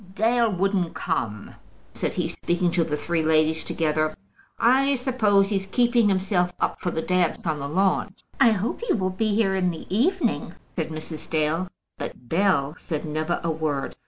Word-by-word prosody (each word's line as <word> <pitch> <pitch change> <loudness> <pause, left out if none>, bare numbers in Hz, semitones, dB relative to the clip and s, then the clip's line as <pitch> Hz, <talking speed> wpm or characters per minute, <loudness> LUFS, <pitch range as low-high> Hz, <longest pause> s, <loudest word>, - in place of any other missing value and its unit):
"Dale 230 +1 +3
wouldn't 190 -2 0
come," 110 - -3 0.4
said - - -3
he, - - 0
speaking 175 0 -1
to 170 -1 +2
the 150 -2 -2
three 170 +1 -1
ladies 160 0 +2
together, 155 -1 0 0.4
"I 270 +4 +4
suppose 215 -6 +2
he's 195 -2 -1
keeping 240 0 +3
himself 185 -2 +1
up - - -1
for 180 - -2
the 160 -2 -3
dance 180 -1 0
on 155 -3 -1
the 140 0 -4
lawn." 190 +3 +1 0.2
"I 235 - +7
hope 210 - -2
he 475 - +1
will 185 -3 0
be 210 +2 0
here 200 -3 +2
in 185 -1 +1
the 165 -2 -6
evening," 270 - +1 0.2
said - - -2
Mrs. 155 0 -7
Dale. 160 +3 0 0.3
But 125 - -7
Bell 165 -6 +2
said 155 -2 -4
never 155 +3 -1
a 165 - 0
word. 155 -3 -2
180 Hz, 175 wpm, -24 LUFS, 160-205 Hz, 0.4 s, I